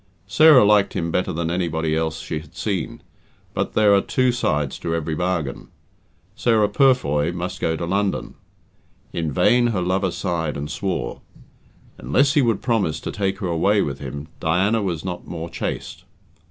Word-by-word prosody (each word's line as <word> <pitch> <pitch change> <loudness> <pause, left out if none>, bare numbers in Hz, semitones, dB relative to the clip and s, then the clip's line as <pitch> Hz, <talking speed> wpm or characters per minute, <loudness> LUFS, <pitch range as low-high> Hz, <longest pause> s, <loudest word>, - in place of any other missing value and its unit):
Sarah 130 +4 +6
liked 105 -1 +4
him 85 0 -2
better 90 - 0
than 85 +1 -2
anybody 80 -3 -1
else 80 0 -2
she 80 - -4
had 80 +2 -16
seen, 100 -4 -3 0.5
but - - -2
there 105 -2 +4
are 100 - +5
two 130 +3 +1
sides 75 - -1
to 85 -1 -2
every 80 -1 -2
bargain. 85 -4 -2 0.7
Sarah 110 -3 +2
Purfoy 95 - +2
must 90 +1 -5
go 80 - +1
to 85 - -3
London. 100 +3 -1 0.8
In 80 -3 -2
vain 120 - +3
her 105 -6 -1
lover 95 +1 0
sighed 85 -5 -2
and 75 +1 -5
swore. 90 -11 -3 0.8
Unless 135 - +2
he 150 - +4
would 115 -5 0
promise 100 -11 0
to - - -5
take 95 -1 -1
her 95 - -1
away 100 +5 +2
with 70 -1 -4
him, 70 +2 -7
Diana 95 +7 +1
was 90 -5 -3
not 90 -1 -5
more 85 0 -6
chaste. - - -5
90 Hz, 165 wpm, -22 LUFS, 80-105 Hz, 0.8 s, Sarah